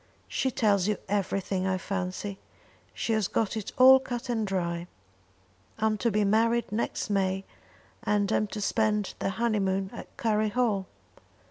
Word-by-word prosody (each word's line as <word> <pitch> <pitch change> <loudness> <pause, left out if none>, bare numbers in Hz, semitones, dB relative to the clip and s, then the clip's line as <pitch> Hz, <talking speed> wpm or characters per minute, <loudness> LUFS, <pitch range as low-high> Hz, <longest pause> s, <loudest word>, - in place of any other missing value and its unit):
"She 265 - 0
tells 205 -6 +2
you 210 -2 +1
everything, 195 -1 -1
I 190 -1 +1
fancy. 195 +1 -4 0.5
She 230 - -2
has 215 -3 +1
got 220 -2 0
it 215 -3 -4
all 265 +1 +9
cut 245 -1 -5
and 225 -3 0
dry. 170 -2 -2 0.9
I'm 220 0 +1
to 235 - +2
be 210 -1 +1
married 230 +3 +2
next 215 0 -2
May, 195 -1 0 0.6
and 205 -1 +1
am 215 - +2
to 210 +1 -6
spend 210 0 +1
the - - 0
honeymoon 195 -3 0
at - - -10
Curry 215 -1 +1
Hall. 210 -5 0
205 Hz, 150 wpm, -28 LUFS, 195-225 Hz, 0.9 s, all